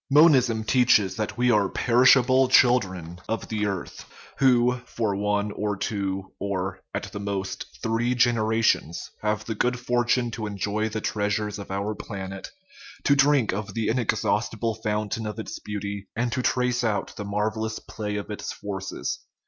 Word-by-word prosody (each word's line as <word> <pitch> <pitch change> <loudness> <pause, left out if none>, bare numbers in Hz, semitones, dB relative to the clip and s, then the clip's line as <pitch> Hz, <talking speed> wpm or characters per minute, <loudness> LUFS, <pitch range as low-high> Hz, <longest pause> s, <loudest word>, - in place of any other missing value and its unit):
Monism 135 -7 +5
teaches 115 -5 +3
that 105 +2 -3
we 125 0 +3
are 105 -3 +3
perishable 130 +2 +5
children 95 -10 +3
of 110 -3 -3
the 105 -1 0
earth, 95 -3 -5 0.4
who 125 -1 +4
for 110 -4 -1
one 105 +1 0
or 105 -1 -2
two, 95 -2 -3
or, 95 -1 -3
at - - -4
the 100 - -6
most, 100 -1 -3 0.2
three 115 +2 +1
generations, 110 -7 +1
have 105 0 -1
the 110 - -2
good 125 +3 0
fortune 120 0 +1
to 110 -1 -4
enjoy 105 +2 -1
the 110 0 -4
treasures 105 0 -1
of 100 - -8
our 100 +2 -2
planet, 95 -2 -7 0.5
to 140 - +4
drink 140 -6 +4
of 105 +3 -5
the 115 -1 0
inexhausti 110 -2 0
ble 115 0 0
fountain 110 0 -2
of 105 0 -5
its 110 - -6
beauty, 100 -1 -5
and 120 +1 0
to 125 - -1
trace 125 -1 +1
out 105 -4 -1
the 105 - -5
marvel 105 +2 -1
lous 110 0 -2
play 105 -1 -5
of 105 +1 -4
its 105 - -4
forces. 95 -2 -4
110 Hz, 165 wpm, -25 LUFS, 100-120 Hz, 0.5 s, Monism